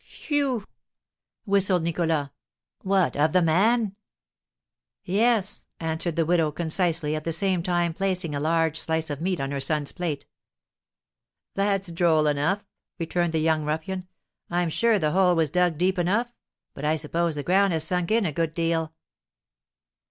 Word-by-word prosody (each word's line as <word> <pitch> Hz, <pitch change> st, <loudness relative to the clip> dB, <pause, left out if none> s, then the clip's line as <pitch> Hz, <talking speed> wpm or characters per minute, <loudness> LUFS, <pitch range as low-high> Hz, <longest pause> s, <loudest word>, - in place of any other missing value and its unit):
"Phew!" 275 Hz, -8 st, -2 dB, 0.8 s
whistled 195 Hz, -4 st, +3 dB
Nicholas; 165 Hz, -4 st, -1 dB, 0.5 s
"what, 190 Hz, -2 st, +1 dB
of 150 Hz, +2 st, +2 dB
the 185 Hz, -, +4 dB
man?" 200 Hz, +6 st, +2 dB, 1.1 s
"Yes," 210 Hz, +1 st, +1 dB
answered 160 Hz, 0 st, -2 dB
the 165 Hz, -1 st, +1 dB
widow, 165 Hz, -2 st, +2 dB
concisely, 160 Hz, -1 st, 0 dB
at 155 Hz, -, -4 dB
the 165 Hz, -, -2 dB
same 185 Hz, +2 st, +1 dB
time 175 Hz, -1 st, 0 dB
placing 185 Hz, -3 st, -1 dB
a 145 Hz, -, -2 dB
large 160 Hz, +1 st, +1 dB
slice 160 Hz, -1 st, -1 dB
of 145 Hz, +1 st, -5 dB
meat 185 Hz, 0 st, -1 dB
on 135 Hz, 0 st, -3 dB
her 140 Hz, -, -2 dB
son's 145 Hz, +1 st, 0 dB
plate. 165 Hz, -5 st, -4 dB, 1.3 s
"That's 195 Hz, -2 st, 0 dB
droll 165 Hz, -2 st, +3 dB
enough," 150 Hz, +8 st, 0 dB, 0.3 s
returned 175 Hz, 0 st, -1 dB
the 160 Hz, -, +1 dB
young 160 Hz, -1 st, +1 dB
ruffian; 160 Hz, +5 st, -3 dB, 0.4 s
"I'm 175 Hz, -1 st, 0 dB
sure 230 Hz, +5 st, +3 dB
the 155 Hz, -5 st, 0 dB
hole 180 Hz, 0 st, +3 dB
was 160 Hz, -3 st, +1 dB
dug 180 Hz, -2 st, +2 dB
deep 185 Hz, +2 st, +1 dB
enough; 220 Hz, +8 st, 0 dB, 0.4 s
but 140 Hz, -, -9 dB
I 155 Hz, +1 st, +2 dB
suppose 165 Hz, +1 st, -1 dB
the 145 Hz, -, -4 dB
ground 195 Hz, +3 st, +3 dB
has 160 Hz, -1 st, 0 dB
sunk 180 Hz, +1 st, -1 dB
in 225 Hz, -1 st, +2 dB
a 165 Hz, -, 0 dB
good 160 Hz, +1 st, -2 dB
deal." 165 Hz, -1 st, -1 dB
170 Hz, 155 wpm, -25 LUFS, 160-190 Hz, 1.3 s, the